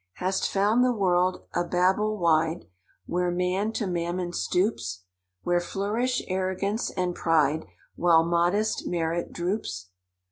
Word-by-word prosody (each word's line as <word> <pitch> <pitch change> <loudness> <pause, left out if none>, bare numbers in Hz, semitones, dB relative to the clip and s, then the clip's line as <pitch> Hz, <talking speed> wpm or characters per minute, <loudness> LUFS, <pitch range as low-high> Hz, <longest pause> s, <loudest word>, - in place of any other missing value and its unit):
"Hast 185 +1 -1
found 210 +5 +3
the 250 - +3
world 185 -4 +1
a 175 - +1
Babel 190 +5 +1
wide, 165 -1 +1 0.4
Where 180 0 0
man 180 +4 0
to 220 - -2
mammon 175 0 -2
stoops? 175 - -1 0.4
Where 175 0 +2
flourish 215 +8 -1
arrogance 190 +3 -1
and 180 -1 -2
pride, 160 -2 +1 0.3
While 165 -2 +4
modest 175 +6 +1
merit 170 0 -1
droops? 170 - -3
180 Hz, 120 wpm, -26 LUFS, 170-200 Hz, 0.4 s, While